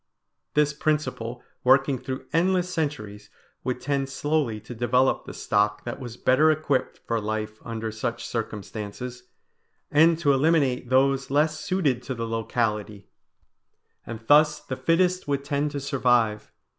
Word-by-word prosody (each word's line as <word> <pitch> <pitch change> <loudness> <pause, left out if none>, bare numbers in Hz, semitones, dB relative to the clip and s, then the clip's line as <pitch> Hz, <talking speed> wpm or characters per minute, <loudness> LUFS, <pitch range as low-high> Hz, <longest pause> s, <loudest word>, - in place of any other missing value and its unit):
This 150 0 +3
principle 150 -6 -2 0.2
working 135 +1 +4
through 130 +1 -6
endless 180 +1 +2
centuries 105 - -4 0.3
would 125 -1 -2
tend 140 -1 -1
slowly 140 -4 -1
to 115 +3 -9
develop 120 +3 +1
the - - -8
stock 105 0 0
that 120 - -5
was 120 -3 -8
better 145 +5 +4
equipped 150 -4 0
for 115 -1 -1
life 110 0 -3
under 115 -1 -4
such 115 +2 -4
circumstances, 115 +2 -5 0.7
and 160 +2 +5
to 145 -4 +3
eliminate 135 -4 +2
those 135 +1 +2
less 150 +2 +2
suited 150 -11 0
to 130 +1 -5
the 115 -1 -3
locality; 110 -2 -2 0.9
and 115 -1 -7
thus 150 +3 +5
the 135 -3 -6
fittest 180 +4 +1
would 140 -1 -1
tend 145 +1 -1
to 145 - -4
survive. 125 -6 +1
130 Hz, 140 wpm, -25 LUFS, 115-150 Hz, 0.9 s, and